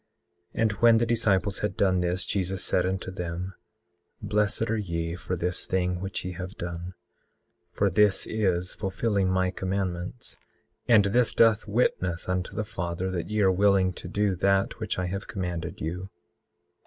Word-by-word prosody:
18:10 - - -1
And 110 - +3
when 115 +2 +5
the 120 - +2
disciples 105 -4 +1
had 105 -2 -2
done 95 -2 +3
this, 90 +1 0
Jesus 95 -1 -1
said 90 0 +2
unto 95 0 -3
them: 90 +1 -5 0.7
Blessed 105 +2 0
are - - +2
ye 85 -4 -3
for 90 +1 -4
this 90 +1 -2
thing 90 -1 0
which 95 0 -4
ye 90 - -3
have 90 +3 -7
done, 85 +1 -6 0.8
for 100 - +1
this 100 +1 +3
is 90 -5 0
fulfilling 100 0 0
my 95 0 +1
commandments, 95 +3 -4 0.5
and 110 -4 +6
this 120 +4 +2
doth 115 -1 +4
witness 90 -6 0
unto 90 0 -2
the 110 - -2
Father 85 -1 -3
that 90 -1 -3
ye 105 0 0
are 95 -1 +5
willing 95 -1 +3
to 90 - -8
do 100 +1 +1
that 95 +2 +1
which 110 -2 -2
I 90 - -1
have 95 +2 -4
commanded 90 -2 -4
you. 90 +4 -4
95 Hz, 165 wpm, -27 LUFS, 90-105 Hz, 0.8 s, and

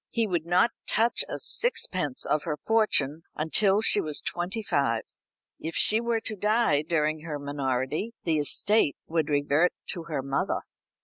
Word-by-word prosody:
He 230 -1 0
would 175 -5 -2
not 180 +6 +3 0.2
touch 230 +2 +2
a - - -3
sixpence 185 - -1
of 150 - +1
her 150 -2 -3
fortune 165 -9 +1
until 195 +6 +2
she 210 - +5
was 150 -2 -1
twenty 185 +6 -3
five. 115 - 0 0.6
If 160 +1 -5
she 220 +2 +4
were 235 -1 -1
to 220 - -4
die 210 -7 +2
during 155 -1 0
her 155 -2 -5
minority 140 - -2
the 160 -3 +1
estate 170 +3 +3
would 160 -2 -1
revert 145 +4 +2 0.2
to 170 -3 -5
her 150 -5 -3
mother. 135 0 -1
165 Hz, 160 wpm, -27 LUFS, 145-210 Hz, 0.6 s, she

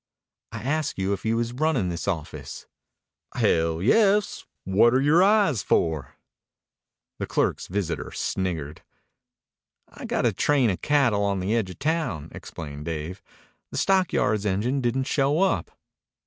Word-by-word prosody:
"I - - -7
asked 150 +2 -1
you 95 +1 0
if 100 - -6
you 115 +1 +1
was 120 +1 -2
runnin' 135 - 0
this 85 -1 -5
office." 85 -7 -5 0.7
"Hell, 80 +1 +1
yes! 205 - +3 0.2
What're 115 +7 +4
your 150 +5 +4
eyes 195 - +3
for?" 80 -7 0 1.0
The - - -3
clerk's - - 0
visitor 90 -3 -3
sniggered. 80 -6 -3 1.1
"I've - - -10
got - - 0
a - - +2
train 135 -7 +2
of 90 - -5
cattle 135 -9 +2
on 100 -1 0
the 95 +5 0
edge 110 -5 0
of 90 - -9
town," 145 - -2
explained 75 -2 -8
Dave. 80 +2 -5 0.5
"The - - -6
stockyards 175 - +2
engine 105 +7 0
didn't 125 +2 0
show 140 +3 +1
up." 115 - +1
110 Hz, 140 wpm, -25 LUFS, 90-145 Hz, 1.1 s, What're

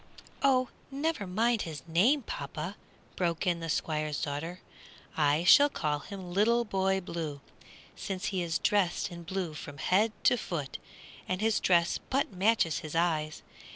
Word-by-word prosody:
"Oh, 255 -2 +3 0.2
never 280 -6 -2
mind 225 +4 +1
his 155 -5 -6
name, 230 - +3
papa!" 155 +3 -5 0.4
broke 170 0 -1
in 175 -2 +1
the 165 0 -5
Squire's 155 -1 -1
daughter; 160 +5 -4 0.6
"I 150 +1 +2
shall 285 +11 +7
call 150 - -1
him 185 +3 -8
Little 235 +5 +3
Boy 190 -2 +1
Blue, 160 -5 -5 0.6
since 195 +1 -4
he 185 - 0
is 165 -2 0
dressed 200 -1 +1
in 170 0 -8
blue 175 -1 -3
from 145 -1 -8
head 205 +9 +2
to 245 - +5
foot, 155 - -4 0.5
and 185 0 -1
his 220 +1 +2
dress 170 -2 +3
but 270 -5 0
matches 185 -4 +2
his 155 -2 -7
eyes. 155 -3 0
180 Hz, 155 wpm, -30 LUFS, 160-210 Hz, 0.6 s, shall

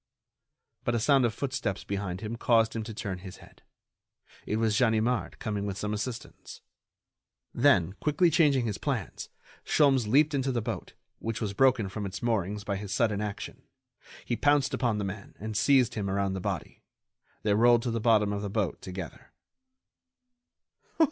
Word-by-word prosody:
But 120 - 0
a - - +1
sound 135 +2 +4
of 115 - 0
footsteps 130 -8 -3
behind 100 -2 -4
him 110 +1 -4
caused 115 -1 +2
him 115 - -1
to 110 - -6
turn 95 -4 -4
his 95 0 -10
head. - - -18 0.9
It - - 0
was 110 -1 +1
Ganimard 115 0 +1
coming 105 -2 -3
with 100 -1 -4
some 105 +1 -2
assistants. 115 +3 -6 0.9
Then, 95 - +3
quickly 160 +3 +2
changing 140 -8 +3
his 105 -3 -3
plans, 125 - -3 0.3
Sholmes 135 -6 +3
leaped 145 +6 +4
into 135 -1 0
the 120 - 0
boat, 110 -4 -5 0.3
which 115 0 -3
was 105 -3 -2
broken 130 -3 +3
from 100 +1 -4
its 95 +4 -7
moorings 105 -3 -1
by 100 -1 -2
his 100 -1 -7
sudden 105 -1 +1
action; 105 -1 -5 0.6
he 120 - -1
pounced 145 +2 +2
upon 115 -4 0
the 105 - -2
man 100 +1 -7
and 110 +1 -5
seized 130 +2 +4
him 100 -3 -3
around 100 0 0
the 95 - -3
body. - - -4 0.6
They 105 - +2
rolled 120 +2 +5
to 120 - -1
the 115 - -1
bottom 105 -3 +3
of 100 - -3
the 100 - -3
boat 100 -3 -2
together. 90 -3 -8
110 Hz, 170 wpm, -28 LUFS, 100-120 Hz, 0.9 s, rolled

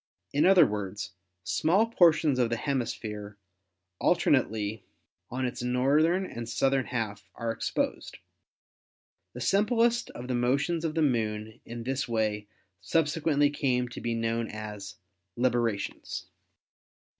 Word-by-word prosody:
In 145 +5 +4
other 190 -2 +7
words, 105 0 -4 0.3
small 160 - +2
portions 165 - +4
of 120 -2 +3
the 115 - -1
hemisphere 110 -6 -3 0.6
alternately 110 - +1 0.5
on 130 +1 -2
its 125 -1 -3
north 130 +5 +3
ern 180 +3 +1
and 115 -8 -6
southern 135 +2 +1
half 105 -6 -4
are 115 -1 -2
exposed. 115 - -2 1.2
The - - -7
simplest 230 +3 +2
of 125 - -8
the 130 - -1
motions 140 +7 +1
of 160 -1 -2
the 160 - +2
Moon 110 -5 -1
in 120 0 -7
this 135 +3 -2
way 110 -3 -1 0.3
subsequently 150 0 +2
came 125 -4 0
to - - -8
be 115 -1 -1
known 115 0 -1
as 105 -3 -7 0.4
"librations." 120 -4 -1
125 Hz, 125 wpm, -28 LUFS, 110-150 Hz, 1.2 s, other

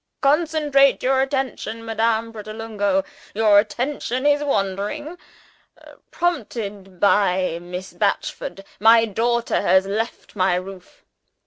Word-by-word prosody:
Concentrate 295 -2 +3
your 265 +1 +3
attention, 265 -4 -3
Madame 225 0 0
Pratolungo! 215 -3 -2 0.3
Your 210 -1 +5
attention 255 +3 -2
is 290 0 +3
wandering. 210 - -2 0.9
Prompted 210 - -3
by 185 -4 +2
Miss 180 +2 -7
Batchford, 200 -1 -2 0.2
my 225 +2 +6
daughter 235 +3 0
has 190 -1 +3
left 220 +4 -4
my 185 -2 +2
roof. 185 0 -8
225 Hz, 100 wpm, -22 LUFS, 195-265 Hz, 0.9 s, my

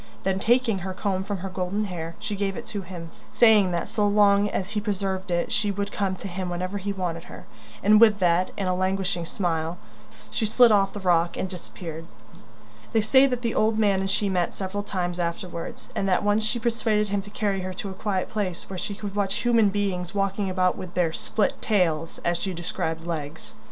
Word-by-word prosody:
Then, 190 0 0
taking 230 -1 +2
her 185 +1 -5
comb 190 -1 -1
from 200 0 -3
her - - -3
golden 190 +3 -2
hair, 170 -3 -5
she 210 - -4
gave 195 -1 -2
it 235 - -6
to 205 -2 -4
him, 170 -3 -8 0.2
saying 215 -5 +6
that 170 - -1
so 210 -1 +1
long 205 0 +4
as 190 0 -3
he 210 - -1
preserved 195 -2 -2
it 175 -1 0
she 210 -1 +1
would 200 +1 -2
come 195 -2 -1
to 195 - -7
him 185 0 -4
whenever 185 +3 -3
he 200 +1 -3
wanted 175 -4 -3
her; 180 - -11 0.4
and 210 +2 +6
with 215 -3 +7
that, 180 -1 +2
and 195 - -1
a 185 - +2
languishing 185 -1 0
smile, 165 -2 -1 0.5
she - - -1
slid 230 +2 +5
off 195 -2 +3
the 205 - -5
rock 175 -2 +2
and - - -1
disappeared. 165 -3 -8 0.9
They 225 - +4
say 265 +5 +5
that 250 -2 -2
the 230 - 0
old 220 0 +2
man 205 -3 +3
and 195 0 -1
she 205 +1 +1
met 180 -3 0
several 195 +1 -3
times 180 -3 -3
afterwards, 170 0 -4
and 195 - 0
that 185 - +2
once 205 +1 +2
she 220 +3 +1
persuaded 220 -2 +1
him 200 0 0
to 205 - -11
carry 205 -2 -1
her 185 0 -4
to 195 +1 -5
a - - -6
quiet 190 -1 -1
place 190 -5 -3
where 185 - -4
she 205 - -4
could 205 -1 -6
watch 200 -1 0
human 230 -4 +4
beings 195 -2 -2
walking 195 0 0
about 185 -1 +2
with 185 -2 -8
their 170 -3 +1
"split 210 +4 0
tails," 165 -6 +1
as 175 0 +1
she 190 -1 -3
described 165 -1 -3
legs. 160 -2 -5
195 Hz, 215 wpm, -25 LUFS, 180-205 Hz, 0.9 s, with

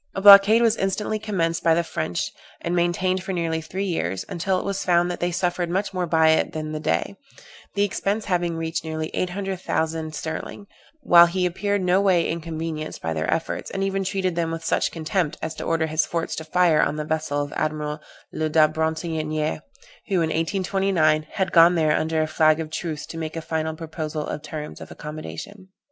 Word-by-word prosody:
A 195 - -2
blockade 205 +3 +9
was 230 -1 +3
instantly 210 +3 -1
commenced 170 -6 -1
by 165 -1 +4
the 170 - +1
French, 90 - -3 0.3
and 170 +1 -2
maintained 180 +2 +1
for 190 +1 -4
nearly 165 -2 -1
three 185 +5 -4
years, 95 - -2
until 185 +2 -1
it - - -4
was 200 -1 -2
found 175 0 +3
that 175 - -5
they 175 - 0
suffered 175 0 -1
much 195 +3 -1
more 180 -1 -1
by 160 -1 +4
it 160 - +2
than 155 0 -4
the 155 - -3
Dey, 155 - -1 0.6
the 200 - +2
expense 205 +1 -1
having 175 -3 0
reached 165 0 -3
nearly 160 0 -4
800,000_l_ 175 -4 -2
sterling, 160 +6 -5 0.4
while 170 -8 +7
he 180 +1 0
appeared 200 +2 -1
no 180 +2 +3
way 185 -4 +3
inconvenienced 160 -1 -4
by 80 0 -3
their 80 +1 -1
efforts, 165 0 -2
and 195 - -3
even 195 0 0
treated 185 -2 -1
them 170 -1 0
with 165 0 -5
such - - +1
contempt 165 0 -1
as 160 0 -4
to - - -7
order 165 -1 +1
his 155 0 +1
forts 165 +1 -3
to 160 - -4
fire 165 -1 +3
on 145 - +1
the 150 0 -3
vessel 155 -2 -1
of 145 0 -3
Admiral 150 0 -2 0.3
Le 155 0 -1
da 155 0 +5
Bretonnière, 160 -1 -2 0.5
who, 195 - -1
in 165 -3 +1
1829, 165 -3 +1
had 190 -2 -1
gone 170 +1 +7
there 155 -2 +3
under 160 0 0
a - - -2
flag 155 0 +3
of 155 -1 -5
truce 155 -2 -4
to 165 - -7
make 160 0 -5
a - - -2
final 160 0 -2
proposal 155 -1 -5
of - - -5
terms 150 0 -7
of - - -9
accommodation. 155 - -8
165 Hz, 200 wpm, -23 LUFS, 155-185 Hz, 0.6 s, blockade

